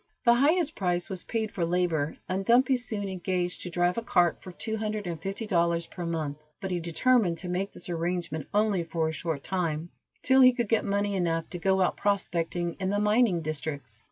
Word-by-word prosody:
The 235 - +7
highest 310 +5 +3
price 175 -2 -1
was 185 -2 -5
paid 220 -2 -2
for 175 - -2
labor, 165 -3 0
and 185 +2 -1
Dumpy 250 +5 +4
soon 220 -5 -3
engaged 180 -1 -2
to 180 - -5
drive 175 +4 +1
a - - -5
cart 175 -6 +2
for 185 - -9
two 220 +5 -3
hundred 215 -1 -3
and 170 -3 -4
fifty 195 +5 -4
dollars 170 -4 +1
per 175 0 -6
month, 155 -3 -3 0.2
but 190 - -4
he 180 - 0
determined 175 +2 +2
to 180 - -7
make 185 +3 -2
this - - -9
arrangement 170 -2 -2
only 205 -3 +2
for 165 -1 -1
a - - -4
short 155 -2 -3
time, 170 -3 -2 0.3
till 265 +1 +5
he 255 -1 +8
could 240 -4 -2
get 225 - +2
money 200 0 0
enough 165 -3 0
to 175 - -4
go 190 +2 +2
out 185 - +1
prospecting 175 -4 -1
in 190 -1 -1
the 205 - +1
mining 210 -4 +3
districts. 145 -7 -5
180 Hz, 210 wpm, -28 LUFS, 170-210 Hz, 0.3 s, he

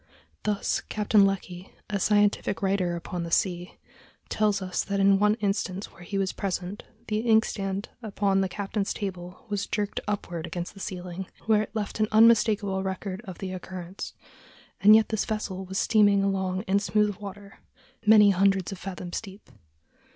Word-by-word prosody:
Thus, 210 -1 0
Captain 210 -1 +4
Lecky, 185 -2 -5 0.2
a 205 -1 -2
scientific 205 0 +2
writer 190 -3 +1
upon 170 +1 -5
the 170 - -4
sea, 175 +1 -1 0.5
tells 210 -2 +1
us 185 -2 -2
that 200 0 -2
in 195 0 +5
one 210 +1 +4
instance 200 -2 -2
where 170 - -17
he 195 +3 -4
was 195 -1 0
present, 190 0 -3 0.3
the 215 0 0
inkstand 215 -3 +1
upon 200 -3 +1
the 190 - 0
captain's 200 +1 -3
table 180 -3 -6
was 205 -1 -2
jerked 210 -1 -2
upward 175 -5 -3
against 175 +1 -5
the 200 - -13
ceiling, 180 -1 -6 0.2
where 215 -1 +4
it 215 - -7
left 215 0 -3
an 215 - +3
unmistakable 215 -3 +4
record 190 +1 -4
of 185 -3 -8
the 190 -1 -5
occurrence; 185 0 -7 0.6
and 210 +2 +8
yet 220 -1 +4
this 220 -2 0
vessel 195 -3 -4
was 190 +1 -5
steaming 205 -2 +4
along 190 -1 -1
in 200 -1 +2
smooth 205 0 +1
water, 200 -1 -10 0.4
many 210 -1 +7
hundreds 195 0 +2
of 195 - -7
fathoms 180 -2 -5
deep. 200 -1 -13
195 Hz, 165 wpm, -27 LUFS, 185-210 Hz, 0.6 s, and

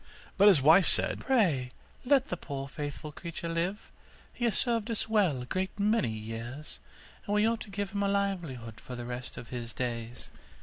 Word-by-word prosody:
But 200 +1 +6
his 175 -10 +6
wife 165 +5 +7
said, - - +2
'Pray 165 - +2 0.3
let 270 0 +4
the - - -1
poor 140 -5 -5
faithful 145 +2 -6
creature 170 +2 -6
live; 170 +5 -2 0.4
he 240 - -2
has 225 -4 +2
served 230 -2 +1
us 225 -1 -1
well 190 - +2
a - - -8
great 190 +7 -3
many 210 - +2
years, 115 - -6 0.5
and 205 - +1
we 210 +1 +4
ought 230 0 0
to - - -7
give 200 0 -3
him 200 0 -2
a 200 - +2
livelihood 170 - -2
for 125 - -8
the 120 0 -6
rest 125 +1 -6
of 115 - -8
his 120 -2 -6
days. 120 -1 -4
170 Hz, 190 wpm, -30 LUFS, 125-205 Hz, 0.5 s, wife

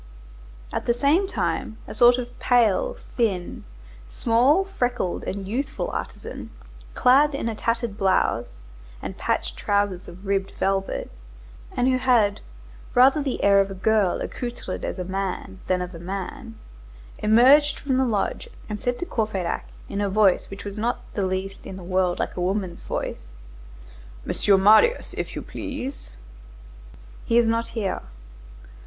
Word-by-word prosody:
At - - -3
the 235 - +3
same 300 +10 +3
time, 220 - -2
a - - -7
sort 245 0 +6
of 245 -1 -6
pale, 245 - +2 0.2
thin, 195 -7 -1 0.4
small, 245 - +3
freckled, 245 - -2
and 195 0 -4
youthful 255 +8 -2
artisan, - - -6 0.5
clad 275 +3 +5
in 275 - -2
a 230 - -1
tattered 230 -1 -2
blouse 185 - +1 0.4
and - - -6
patched - - -2
trousers 200 -3 0
of 180 +3 -12
ribbed 195 0 -1
velvet, 195 0 -1 0.7
and 250 0 +3
who 255 -1 +2
had 235 -6 +3 0.6
rather 265 +4 +6
the 275 -3 -2
air 200 0 +6
of 195 0 +2
a 195 - -6
girl 205 -1 +2
accoutred 240 -1 -5
as - - -3
a 180 - -3
man 190 0 -4
than 180 -1 +1
of 180 +1 -8
a 165 - -8
man, 200 +7 -6 0.6
emerged 260 +8 +5
from 265 -3 -1
the 265 - +3
lodge 235 - -1 0.2
and 210 -1 -5
said 245 0 -1
to 355 - -4
Courfeyrac 215 - -2 0.2
in 200 - -3
a 200 - 0
voice 195 -2 +3
which 195 +1 -9
was 205 +1 -5
not 235 +3 -1
the 195 -3 0
least 190 +1 -4
in 190 - -7
the 185 - -9
world 185 0 +1
like - - -3
a 180 - -3
woman's 185 -1 -2
voice:— - - -4 1.0
"Monsieur 200 -1 +3
Marius, 220 - +5
if - - -4
you - - -5
please." 270 +3 -6 1.1
"He 230 - +2
is 235 -1 +5
not 230 +1 +1
here." 200 -4 -1
215 Hz, 155 wpm, -24 LUFS, 195-245 Hz, 1.1 s, sort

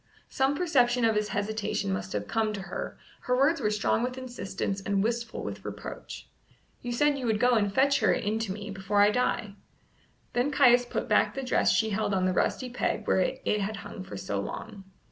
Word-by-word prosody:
Some 270 +1 +1
perception 250 -8 +2
of 225 -1 +3
his 210 0 +1
hesitation 210 - -2
must 95 0 -4
have 105 -1 -3
come 220 -1 0
to 200 - -4
her; - - -6 0.2
her 250 0 0
words 280 +3 +3
were 210 - +2
strong 210 +1 +1
with 250 +1 -2
insistence 200 -6 -4
and 195 0 0
wistful 230 0 -2
with - - -6
reproach. - - -8 0.5
"You 245 - -4
said 285 +3 +2
you 250 - -3
would 220 -2 +1
go 250 +2 +4
and 205 -3 +2
fetch 280 +6 +3
her 215 - +3
in 215 +2 0
to 225 -4 -2
me 205 +1 -6
before 195 +1 +2
I 205 - +5
die." 230 -3 0 0.8
Then 245 +4 +1
Caius 250 -4 +5
put - - -3
back - - +3
the 270 - -3
dress 255 - +2
she 220 -1 +2
held 205 -1 0
on 185 -1 +1
the 185 - +1
rusty 250 +7 0
peg 245 - -1
where - - +2
it 210 - 0
had 210 +2 -2
hung 190 - -7
for 100 - -8
so 100 +1 -3
long. 200 - -6
220 Hz, 210 wpm, -28 LUFS, 200-250 Hz, 0.8 s, I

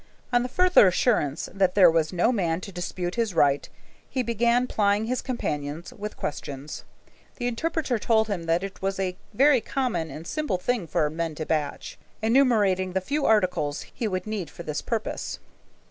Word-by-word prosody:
On 245 - +5
the 250 - -3
further 365 - +5
assurance 175 - +1
that 190 -2 +2
there 185 -4 +7
was 160 -1 +1
no 185 +6 +2
man 175 -8 0
to 195 - -8
dispute 175 0 -4
his 225 -6 -1
right, 140 -2 +3 0.4
he 255 - -1
began 235 +1 +2
plying 205 -3 +1
his 250 +2 -1
companions 155 - -4
with 210 -2 -7
questions. 145 0 -5 0.5
The 245 - -4
interpreter 260 0 -1
told 220 0 +2
him 190 -6 -3
that 165 +3 +2
it 195 0 -7
was 195 0 -2
a 185 -1 -1 0.2
very 275 0 +5
common 245 - -2
and 155 +2 -8
simple 300 - -1
thing 215 -1 -1
for 150 - +1
men 165 -1 -3
to 155 - -4
batch, 150 -3 -3 0.2
enumerating 215 -6 +3
the 190 - +2
few 280 +9 -1
articles 180 -9 +1
he 230 - -2
would 185 -3 -2
need 210 -7 -4
for 170 - -10
this 150 -2 -3
purpose. 225 -2 -3
195 Hz, 175 wpm, -26 LUFS, 170-240 Hz, 0.5 s, there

